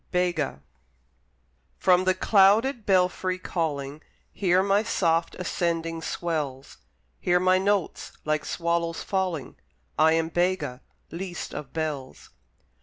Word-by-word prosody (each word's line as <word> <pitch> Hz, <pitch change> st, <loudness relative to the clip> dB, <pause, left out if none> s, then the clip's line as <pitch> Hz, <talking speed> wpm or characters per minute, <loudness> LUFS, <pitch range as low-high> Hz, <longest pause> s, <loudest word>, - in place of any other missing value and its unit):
BEGA 175 Hz, -, -1 dB, 1.1 s
From 185 Hz, 0 st, +3 dB
the 185 Hz, 0 st, +3 dB
clouded 215 Hz, +4 st, +4 dB
belfry 185 Hz, -1 st, +2 dB
calling 150 Hz, -5 st, -3 dB, 0.3 s
Hear 185 Hz, -1 st, +2 dB
my 200 Hz, +1 st, +3 dB
soft 165 Hz, -6 st, 0 dB
ascending 165 Hz, -2 st, -2 dB
swells, 150 Hz, -6 st, -4 dB, 0.4 s
Hear 180 Hz, 0 st, +2 dB
my 185 Hz, +1 st, +4 dB
notes 200 Hz, -1 st, -1 dB
like 155 Hz, 0 st, 0 dB
swallows 170 Hz, -1 st, -1 dB
falling: 185 Hz, -7 st, -2 dB, 0.4 s
I 160 Hz, +1 st, +6 dB
am 165 Hz, 0 st, +1 dB
Bega, 175 Hz, -7 st, -1 dB, 0.3 s
least 175 Hz, +1 st, -6 dB
of 150 Hz, -2 st, -7 dB
bells. 150 Hz, -5 st, -5 dB
175 Hz, 110 wpm, -26 LUFS, 160-185 Hz, 1.1 s, I